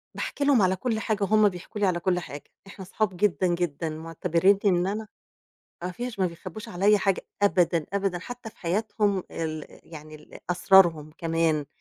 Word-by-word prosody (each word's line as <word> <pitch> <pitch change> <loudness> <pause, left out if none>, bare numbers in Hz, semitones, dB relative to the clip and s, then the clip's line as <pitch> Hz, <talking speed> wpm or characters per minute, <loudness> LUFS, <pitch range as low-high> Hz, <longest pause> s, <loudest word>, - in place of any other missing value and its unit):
باحكي 285 - -3
لهم 280 -5 +4
على 185 0 +3
كُلّ 220 +3 -2
حاجة 215 -2 -1
وهُم 215 +1 +4
بيحكوا 190 +3 -8
لي 200 - +4
على 175 -2 0
كُلّ 180 0 +1
حاجة، 145 -4 -8 0.2
إحنا 195 -1 -10
صحاب 190 -1 -2
جدًا 190 -1 +2
جدًا، 170 -3 -1
معتبرينني 165 +4 +1
إن 180 -1 +3
أنا 215 +2 -3 0.8
ما 180 - -3
فيش، 240 0 -6
ما 185 - +2
بيخبوش 180 +4 -8
عليَّ 200 +4 +3
حاجة 195 -1 0 0.2
أبدًا، 175 -5 +2
أبدًا، 195 -3 -1
حتى 245 +3 -8
في - - -30
حياتهم 200 +1 0
ال 155 -2 -4 0.3
يعني 155 0 -10
ال 150 0 -13
أسرارهم 175 -4 +4
كمان، 165 -3 0
185 Hz, 175 wpm, -26 LUFS, 165-205 Hz, 0.8 s, لهم